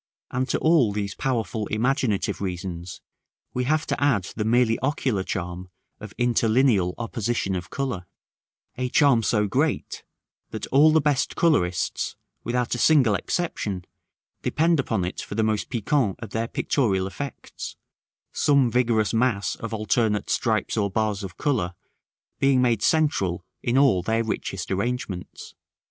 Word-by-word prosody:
And 130 +1 -1
to - - +1
all 155 -9 +4
these 100 -1 -3
powerful 110 -5 -2
imaginative 115 -2 0
reasons 90 -2 -5 0.5
we 125 0 -1
have 155 +3 +1
to - - -1
add 125 -10 +3
the 105 - -1
merely 115 +1 +3
ocular 130 -6 0
charm 90 -1 -4 0.3
of 110 -2 -10
interlineal 115 -5 +2
opposition 115 -4 -2
of 90 -1 -5
color; 125 -10 -3 0.7
a 125 0 -1
charm 135 -3 +4
so 105 -1 +1
great, 100 - -1 0.5
that - - -5
all 145 +4 +6
the 160 - +5
best 145 -2 +1
colorists, 90 - +1 0.3
without 125 0 -1
a 120 - -2
single 130 -6 +5
exception, 100 - -2 0.6
depend 165 0 +2
upon 110 -8 0
it 90 - -4
for - - -7
the 110 - +1
most 110 -2 0
piquant 120 -2 0
of 115 -4 -8
their 115 +1 -1
pictorial 100 -8 0
effects, 140 +8 -7 0.6
some 140 -4 +3
vigorous 115 -3 +2
mass 115 -5 +1
of 115 - -6
alternate 110 -1 0
stripes - - 0
or 100 -2 +1
bars 105 0 -1
of 90 -2 -8
color 115 - -1 0.6
being 135 -1 +4
made 120 -4 +2
central 100 - +1 0.2
in 120 +2 +1
all 135 -10 +4
their 115 +5 0
richest 95 -4 -4
arrangements. 100 -2 -4
115 Hz, 145 wpm, -24 LUFS, 100-130 Hz, 0.7 s, all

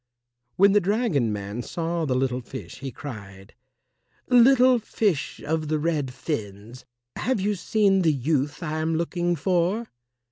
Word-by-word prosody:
When 200 +1 +5
the 205 - +5
dragon 195 - +1
man 100 +2 -4
saw 165 +4 -3
the 130 -3 0
little 130 -1 0
fish, 130 +2 -9
he 135 -1 -5
cried, 100 -7 -10 0.8
"Little 250 0 +6
fish 205 -7 -1
of 155 +1 -1
the 155 +1 0
red 150 -4 -1
fins, 115 -3 -6 0.3
have 255 -3 0
you 205 +2 0
seen 200 0 +2
the 165 -3 +3
youth 145 +2 -1
I 155 0 -2
am 160 +1 0
looking 175 +1 -1
for?" 185 +7 0
160 Hz, 145 wpm, -25 LUFS, 130-195 Hz, 0.8 s, Little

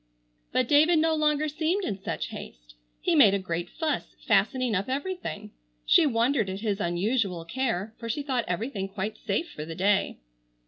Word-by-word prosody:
But 255 - +1
David 310 +5 +5
no 320 +1 +3
longer 305 -1 +2
seemed 325 +6 0
in 200 - -3
such - - -3
haste. - - -10 0.3
He 350 - +1
made 220 -11 +6
a - - +2
great 175 -2 -3
fuss 315 -2 -3
fastening 225 +3 +2
up 195 +5 -1
everything. 275 - -4 0.3
She 295 - +5
wondered 235 -3 +1
at 190 +1 -5
his 210 -3 -1
unusual 180 0 0
care, 225 -1 -2
for 230 - -6
she 285 +6 -2
thought 260 -5 -1
everything 195 +2 -2
quite 210 +2 -4
safe 220 - -2
for 150 - -6
the 165 +1 -7
day. 195 +3 +1
225 Hz, 175 wpm, -27 LUFS, 195-290 Hz, 0.3 s, made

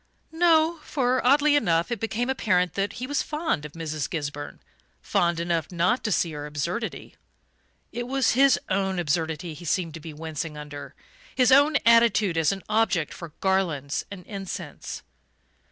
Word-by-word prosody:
No 325 0 +3
for, 255 -4 0
oddly 290 +3 +5
enough, 170 -7 +2
it 240 - -2
became 225 +2 -2
apparent 185 -9 +1
that 200 +1 -1
he 250 - -5
was 285 +2 0
fond 300 - -2
of 150 - -9
Mrs. 155 -2 -4
Gisburn 145 -4 -5 0.4
fond 175 -4 +1
enough 170 -1 -1
not 180 +8 +1
to 215 - -1
see 170 - +1
her 150 -1 -6
absurdity. 170 +10 -4 0.8
It 240 0 -4
was 265 -2 +2
his 270 +1 +4
own 190 0 0
absurdity 160 0 -1
he 165 - -11
seemed 165 0 -1
to 160 - -7
be 160 +1 -8
wincing 155 0 -5
under 145 -1 -8 0.4
his 255 0 +4
own 285 +3 +6
attitude 230 -5 +5
as 160 -2 +3
an 195 -1 -5
object 210 -8 +1
for 170 -4 -9
garlands 170 -8 0
and 190 -3 -9
incense. 195 -3 -7
185 Hz, 160 wpm, -25 LUFS, 160-245 Hz, 0.8 s, own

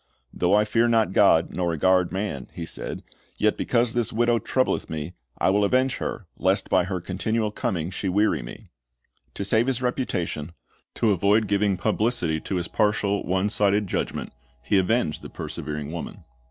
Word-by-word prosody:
"Though 90 +3 +2
I 105 0 +4
fear 115 +2 +2
not 110 -5 +2
God, 85 -6 +4
nor 90 -1 -1
regard 90 +2 +2
man," 95 -9 -3
he 85 - -5
said, - - -6 0.3
"yet - - +2
because 115 0 +1
this 120 -2 -1
widow 120 +1 +2
troubleth 130 +2 0
me, 80 +2 -5 0.2
I - - +2
will 100 +1 +2
avenge 130 +5 +2
her, - - -4
lest - - +1
by - - +4
her 95 0 -3
continual 105 +5 -2
coming 85 -4 -2
she 95 0 -3
weary 105 +4 +2
me." - - -11 0.6
To 100 - -3
save 110 +5 +2
his 130 -2 0
reputation,' 90 - -2 0.4
to 110 - +2
avoid 100 +3 +3
giving 100 -1 +1
publicity 105 -8 +1
to 95 - -4
his 90 -2 -1
partial, 105 0 +1
one 95 +2 +1
sided 105 0 +2
judgment, 90 - -3 0.3
he 100 +8 +3
avenged 95 -4 0
the - - -9
persevering 75 0 -5
woman. 85 0 -7
100 Hz, 170 wpm, -25 LUFS, 90-110 Hz, 0.6 s, I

